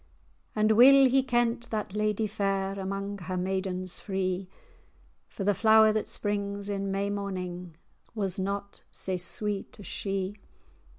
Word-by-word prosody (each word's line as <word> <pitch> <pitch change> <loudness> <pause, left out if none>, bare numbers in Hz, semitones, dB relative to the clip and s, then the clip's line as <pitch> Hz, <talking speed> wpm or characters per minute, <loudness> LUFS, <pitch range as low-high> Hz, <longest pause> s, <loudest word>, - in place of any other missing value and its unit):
[#] - - -32 0.5
bower. 215 - 0
And 215 - +4
weel 265 +4 +8
he 265 +1 +4
kent 240 -2 0
that 210 -3 -3
ladye 215 +1 0
fair 195 -2 -1
Amang 195 +1 -4
her 185 +1 -4
maidens 185 0 -2
free, 185 -1 -2 0.8
For 195 - -6
the 205 +1 +3
flower 220 +1 +6
that 215 - -1
springs 200 -1 -3
in 200 -1 -2
May 200 +1 -1
morning 180 -4 -5 0.4
Was 195 -2 -1
not 200 +1 -4
sae 185 -1 -3
sweet 200 +3 -3
as 205 - -10
she. 195 +1 -3
200 Hz, 145 wpm, -28 LUFS, 190-215 Hz, 0.8 s, weel